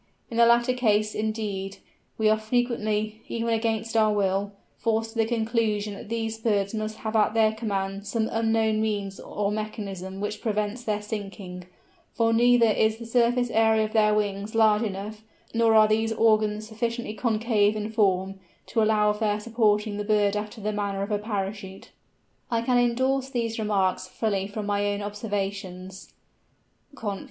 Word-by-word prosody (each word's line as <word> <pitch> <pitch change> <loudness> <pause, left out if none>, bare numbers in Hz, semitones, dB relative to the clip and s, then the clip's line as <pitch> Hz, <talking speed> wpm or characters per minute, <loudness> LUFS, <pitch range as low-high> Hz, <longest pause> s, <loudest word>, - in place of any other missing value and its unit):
In 230 - -4
the 235 0 +6
latter 235 +1 +4
case, 215 -4 +1
indeed, 210 -3 -3 0.4
we 220 - +2
are 215 0 +3
frequently, 215 -2 -1
even 230 0 -2
against 225 0 -1
our 215 -1 +4
will, 200 0 0 0.3
forced 225 0 0
to 230 - -6
the 220 - +3
conclusion 220 -3 0
that 205 +2 -10
these 225 -1 -3
birds 205 -3 0
must 215 0 -3
have 220 +1 -2
at 215 0 +3
their 220 -1 +4
command 200 -2 -3
some 220 +1 0
unknown 225 -1 +1
means 205 -3 -2
or 205 -1 -2
mechanism 200 -3 -5
which 210 +1 -4
prevents 215 +2 -2
their 210 -2 -2
sinking; 195 -4 -6 0.5
for 230 -1 +2
neither 240 +1 +5
is 220 0 +2
the 230 - -9
surface 245 +1 +2
area 220 0 +3
of 215 - -7
their 210 -1 +4
wings 205 0 -2
large 215 -1 +4
enough, 210 0 -4 0.3
nor 230 -1 +3
are 215 0 +7
these 220 +1 +1
organs 215 -1 +2
sufficiently 230 0 -3
concave 215 -1 +1
in 215 +1 -3
form, 195 -3 +1 0.3
to 225 - 0
allow 215 -1 +3
of 210 - -5
their 210 -2 +1
supporting 215 -2 +1
the 210 - -2
bird 205 -1 +2
after 210 +2 -4
the 210 +1 -2
manner 200 -1 -2
of 200 - -5
a 205 - +1
parachute." 200 -2 -5 0.6
I 230 -1 0
can 245 0 +3
endorse 260 +3 +1
these 230 -3 -2
remarks 195 -3 0
fully 195 -1 -1
from 210 +1 -5
my 205 0 0
own 205 0 -2
observations 195 -3 -5 0.8
(Conf. 205 -7 -4
215 Hz, 165 wpm, -26 LUFS, 205-225 Hz, 0.8 s, are